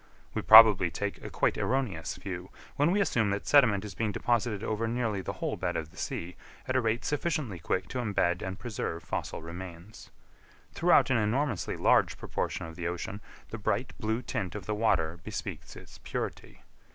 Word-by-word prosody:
We 110 Hz, -, -1 dB
probably 105 Hz, -2 st, +9 dB
take 100 Hz, +4 st, -4 dB
a -, -, -6 dB
quite -, -, 0 dB
erroneous 110 Hz, -, -1 dB
view, 90 Hz, -2 st, -6 dB, 0.3 s
when 145 Hz, +3 st, +3 dB
we 195 Hz, +4 st, +2 dB
assume 115 Hz, -, +1 dB
that 100 Hz, +1 st, -2 dB
sediment 110 Hz, -9 st, +4 dB
is 100 Hz, -, -7 dB
being 110 Hz, 0 st, -1 dB
deposited 115 Hz, -1 st, 0 dB
over 110 Hz, +1 st, -1 dB
nearly 115 Hz, -4 st, -1 dB
the -, -, -4 dB
whole -, -, -3 dB
bed -, -, -2 dB
of 80 Hz, 0 st, -5 dB
the -, -, -19 dB
sea, 85 Hz, +2 st, -4 dB, 0.3 s
at 130 Hz, -, -1 dB
a 130 Hz, -, +4 dB
rate 115 Hz, +1 st, -1 dB
sufficiently 150 Hz, -, -1 dB
quick 95 Hz, +3 st, -1 dB
to 130 Hz, -, -3 dB
embed 95 Hz, -6 st, 0 dB
and 95 Hz, 0 st, -4 dB
preserve 100 Hz, -8 st, -4 dB
fossil -, -, -4 dB
remains. 85 Hz, +4 st, -9 dB, 0.6 s
Throughout 170 Hz, -5 st, +4 dB
an 130 Hz, -, +4 dB
enormously 115 Hz, +1 st, 0 dB
large -, -, +3 dB
proportion -, -, -3 dB
of 80 Hz, 0 st, -9 dB
the 85 Hz, 0 st, -3 dB
ocean, 90 Hz, +4 st, -4 dB, 0.3 s
the 110 Hz, -, -6 dB
bright 110 Hz, +4 st, -1 dB
blue 110 Hz, +2 st, -1 dB
tint 95 Hz, -1 st, -3 dB
of 105 Hz, -, -6 dB
the 105 Hz, -, -2 dB
water 90 Hz, -6 st, +1 dB
bespeaks 90 Hz, -8 st, -6 dB
its -, -, -13 dB
purity. -, -, -6 dB
105 Hz, 185 wpm, -29 LUFS, 90-120 Hz, 0.6 s, probably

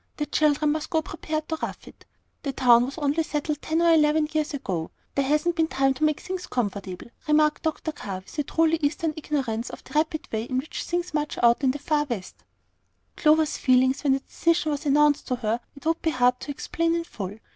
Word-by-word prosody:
The 295 Hz, -, -1 dB
children 295 Hz, 0 st, +2 dB
must 310 Hz, 0 st, -3 dB
go 320 Hz, -2 st, +1 dB
prepared 310 Hz, 0 st, -4 dB
to 320 Hz, -1 st, -2 dB
rough -, -, -5 dB
it. -, -, -16 dB, 0.3 s
The 275 Hz, -, -3 dB
town 245 Hz, -2 st, +5 dB
was 270 Hz, +4 st, -7 dB
only 295 Hz, +1 st, +1 dB
settled 300 Hz, -1 st, -2 dB
ten 320 Hz, +2 st, 0 dB
or 335 Hz, -1 st, +6 dB
eleven 300 Hz, 0 st, +4 dB
years 310 Hz, -1 st, 0 dB
ago; 190 Hz, -, -3 dB, 0.2 s
there 275 Hz, -1 st, 0 dB
hasn't 305 Hz, +4 st, +2 dB
been 320 Hz, -1 st, +2 dB
time 270 Hz, -3 st, +2 dB
to 265 Hz, -, -5 dB
make 305 Hz, -1 st, +2 dB
things 370 Hz, -1 st, -5 dB
comfortable," 200 Hz, -3 st, -4 dB, 0.2 s
remarked 300 Hz, 0 st, +3 dB
Dr. 315 Hz, 0 st, -2 dB
Carr, 195 Hz, -10 st, -6 dB
with 245 Hz, -, -10 dB
a -, -, +4 dB
truly 325 Hz, +3 st, +2 dB
Eastern 305 Hz, +2 st, 0 dB
ignorance 260 Hz, -7 st, -2 dB
of -, -, -10 dB
the -, -, -14 dB
rapid 315 Hz, +1 st, 0 dB
way 220 Hz, 0 st, -2 dB
in 255 Hz, -, -2 dB
which 270 Hz, +4 st, -3 dB
things 350 Hz, -1 st, -2 dB
march 300 Hz, -1 st, -2 dB
in 240 Hz, +3 st, +4 dB
the 265 Hz, -, 0 dB
far 295 Hz, +1 st, 0 dB
West. 225 Hz, -9 st, -6 dB, 0.7 s
Clover's 310 Hz, 0 st, +3 dB
feelings 260 Hz, +1 st, +3 dB
when 275 Hz, -2 st, +4 dB
the 270 Hz, -, 0 dB
decision 335 Hz, 0 st, 0 dB
was 295 Hz, +1 st, -3 dB
announced 295 Hz, +1 st, +3 dB
to 255 Hz, -, 0 dB
her 230 Hz, -1 st, -1 dB, 0.2 s
it 280 Hz, -, -14 dB
would 325 Hz, +1 st, +1 dB
be 325 Hz, -, +1 dB
hard 250 Hz, -3 st, +2 dB
to -, -, -8 dB
explain 330 Hz, +3 st, -1 dB
in 335 Hz, -, -1 dB
full. 205 Hz, -, -7 dB
295 Hz, 215 wpm, -25 LUFS, 255-315 Hz, 0.7 s, or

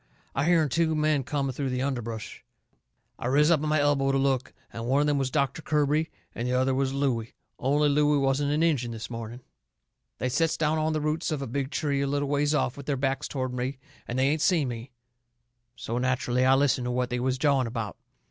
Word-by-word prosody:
I 135 Hz, -, 0 dB
hearn 165 Hz, -2 st, +4 dB
two 160 Hz, +4 st, +1 dB
men 155 Hz, -2 st, +2 dB
coming 140 Hz, 0 st, -1 dB
through 135 Hz, +1 st, -2 dB
the 125 Hz, 0 st, -1 dB
underbrush. 115 Hz, -5 st, -4 dB, 0.8 s
I -, -, -3 dB
riz 150 Hz, +5 st, +4 dB
up 155 Hz, -4 st, +3 dB
on 155 Hz, -, -1 dB
my 155 Hz, 0 st, +3 dB
elbow 145 Hz, -1 st, +2 dB
to 135 Hz, -, +2 dB
look, 135 Hz, -2 st, 0 dB, 0.2 s
and 115 Hz, +1 st, -5 dB
one 135 Hz, +3 st, +3 dB
of 145 Hz, -, +3 dB
them 145 Hz, -1 st, +2 dB
was 135 Hz, -1 st, 0 dB
Doctor 140 Hz, +1 st, 0 dB
Kirby 150 Hz, +1 st, +1 dB, 0.2 s
and 120 Hz, -, -3 dB
the 125 Hz, -, 0 dB
other 130 Hz, +1 st, +2 dB
was 135 Hz, 0 st, 0 dB
Looey, 130 Hz, -5 st, -1 dB, 0.2 s
only 145 Hz, +2 st, +2 dB
Looey 145 Hz, 0 st, +3 dB
wasn't 140 Hz, +1 st, +1 dB
an 150 Hz, +2 st, +2 dB
Injun 140 Hz, -8 st, +1 dB
this 115 Hz, 0 st, -7 dB
morning. 115 Hz, +1 st, -6 dB, 0.8 s
They 130 Hz, -, -1 dB
sets 160 Hz, +6 st, +1 dB
down 155 Hz, 0 st, +1 dB
on 155 Hz, 0 st, 0 dB
the 155 Hz, -, -1 dB
roots 155 Hz, +3 st, -1 dB
of 145 Hz, -3 st, -2 dB
a -, -, -3 dB
big 135 Hz, +2 st, -3 dB
tree 145 Hz, -2 st, -1 dB
a 140 Hz, -, 0 dB
little 145 Hz, 0 st, -1 dB
ways 145 Hz, +1 st, +2 dB
off, 135 Hz, -3 st, 0 dB
with 140 Hz, -, -9 dB
their 140 Hz, -2 st, 0 dB
backs 135 Hz, +2 st, -1 dB
toward 130 Hz, -2 st, -3 dB
me, 125 Hz, +2 st, -3 dB, 0.3 s
and 120 Hz, -, -3 dB
they 130 Hz, +1 st, +3 dB
ain't 155 Hz, +1 st, 0 dB
seen 160 Hz, -8 st, +2 dB
me. 120 Hz, +1 st, -6 dB, 0.9 s
So 115 Hz, +2 st, -3 dB
nacherally 125 Hz, 0 st, +1 dB
I 130 Hz, -, +6 dB
listened 135 Hz, -2 st, +2 dB
to 125 Hz, -, -1 dB
what 125 Hz, 0 st, -1 dB
they 125 Hz, -, -1 dB
was 130 Hz, +1 st, 0 dB
jawing 140 Hz, -3 st, +2 dB
about. 115 Hz, -4 st, -4 dB
135 Hz, 225 wpm, -27 LUFS, 125-150 Hz, 0.9 s, I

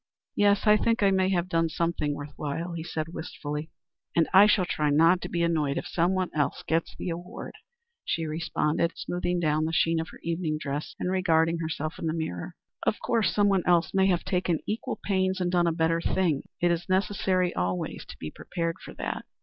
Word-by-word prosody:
"Yes. 205 Hz, -1 st, +3 dB
I 210 Hz, 0 st, +7 dB
think 230 Hz, 0 st, +1 dB
I 195 Hz, -, +5 dB
may 190 Hz, -1 st, +2 dB
have 180 Hz, -2 st, +1 dB
done 165 Hz, -2 st, +1 dB
something 160 Hz, -3 st, -1 dB
worth 145 Hz, 0 st, -8 dB
while," 165 Hz, +4 st, -3 dB
he 165 Hz, -1 st, -4 dB
said, 160 Hz, -1 st, -4 dB
wistfully. 150 Hz, -2 st, -5 dB, 0.5 s
"And 165 Hz, -, +4 dB
I 195 Hz, +2 st, +9 dB
shall 195 Hz, -3 st, +3 dB
try 150 Hz, -3 st, 0 dB
not 165 Hz, +5 st, +5 dB
to -, -, -5 dB
be 170 Hz, -1 st, 0 dB
annoyed 155 Hz, -4 st, +1 dB
if -, -, -3 dB
someone 180 Hz, +2 st, 0 dB
else 145 Hz, -2 st, -1 dB
gets 165 Hz, +1 st, 0 dB
the 175 Hz, -, -4 dB
award," 175 Hz, +2 st, -7 dB, 0.5 s
she 165 Hz, -, -1 dB
responded, 160 Hz, +1 st, 0 dB
smoothing 175 Hz, 0 st, -2 dB
down 155 Hz, -1 st, +1 dB
the 160 Hz, -, -1 dB
sheen 165 Hz, 0 st, +2 dB
of 160 Hz, -, -4 dB
her -, -, -13 dB
evening 165 Hz, -2 st, -1 dB
dress 145 Hz, 0 st, -4 dB
and 180 Hz, -, -1 dB
regarding 165 Hz, -3 st, +2 dB
herself 155 Hz, -1 st, -3 dB
in 165 Hz, -, -2 dB
the 155 Hz, -, 0 dB
mirror. 160 Hz, -, -4 dB, 0.3 s
"Of -, -, 0 dB
course 225 Hz, -6 st, +1 dB
someone 200 Hz, -2 st, +3 dB
else 175 Hz, -1 st, +3 dB
may 190 Hz, 0 st, +4 dB
have 175 Hz, -3 st, +2 dB
taken 180 Hz, -3 st, 0 dB
equal 215 Hz, +2 st, -3 dB
pains 190 Hz, -1 st, +1 dB
and 180 Hz, -1 st, 0 dB
done 175 Hz, -1 st, +3 dB
a -, -, +3 dB
better 165 Hz, 0 st, +1 dB
thing. 165 Hz, -6 st, 0 dB
It 175 Hz, 0 st, +3 dB
is 170 Hz, +2 st, -2 dB
necessary 185 Hz, -1 st, +1 dB
always 90 Hz, 0 st, -2 dB
to -, -, -11 dB
be 75 Hz, -, -6 dB
prepared 165 Hz, -2 st, -3 dB
for -, -, -10 dB
that." -, -, -4 dB
170 Hz, 205 wpm, -27 LUFS, 160-185 Hz, 0.5 s, I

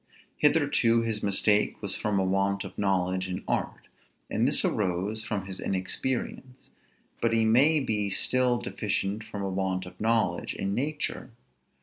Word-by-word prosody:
Hitherto 115 Hz, 0 st, +3 dB
his 110 Hz, -2 st, -2 dB
mistake 105 Hz, +1 st, +2 dB
was 100 Hz, -2 st, -3 dB
from 105 Hz, -2 st, -1 dB
a -, -, +2 dB
want 100 Hz, +1 st, 0 dB
of -, -, -9 dB
knowledge 95 Hz, -2 st, 0 dB
in 90 Hz, -, -4 dB
art, -, -, -3 dB, 0.4 s
and -, -, +2 dB
this -, -, +1 dB
arose 100 Hz, +3 st, -1 dB
from 100 Hz, -3 st, -3 dB
his 95 Hz, -1 st, -5 dB
inexperience; 125 Hz, +6 st, -2 dB, 0.5 s
but 115 Hz, -1 st, +2 dB
he 115 Hz, -1 st, +3 dB
may 140 Hz, +8 st, +5 dB
be 105 Hz, -6 st, 0 dB
still 125 Hz, +4 st, +2 dB
deficient 105 Hz, -3 st, -3 dB
from 105 Hz, -2 st, -6 dB
a -, -, -1 dB
want 95 Hz, -1 st, -2 dB
of -, -, -12 dB
knowledge 115 Hz, +1 st, 0 dB
in 100 Hz, 0 st, -2 dB
nature. 150 Hz, +6 st, -2 dB
105 Hz, 150 wpm, -27 LUFS, 95-115 Hz, 0.5 s, may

